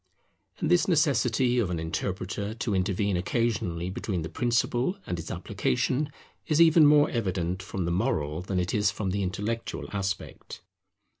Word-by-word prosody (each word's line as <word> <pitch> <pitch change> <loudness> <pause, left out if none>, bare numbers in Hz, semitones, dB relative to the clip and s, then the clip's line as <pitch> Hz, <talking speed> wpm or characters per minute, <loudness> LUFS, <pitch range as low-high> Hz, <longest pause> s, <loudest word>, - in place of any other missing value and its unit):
And 160 -2 -1
this 175 +3 +4
necessity 130 - +2
of 105 -6 +1
an 85 -2 -2
interpreter 95 +5 -3
to 115 -2 -2
intervene 95 +1 0
occasionally 90 -3 -1
between 95 -3 -3
the 80 - -5
principle 120 - +1
and 90 - -3
its 80 - -7
application, 135 - -1 0.4
is 155 0 +2
even 160 -2 +7
more 145 0 +5
evident 95 -5 -1
from 95 -1 -4
the 85 - -1
moral 85 - 0
than 95 0 -2
it 90 +1 -1
is 105 -1 +3
from 100 -3 -3
the 100 +1 -1
intellectual 105 +5 -3
aspect. 95 -2 -4
100 Hz, 155 wpm, -27 LUFS, 90-125 Hz, 0.4 s, even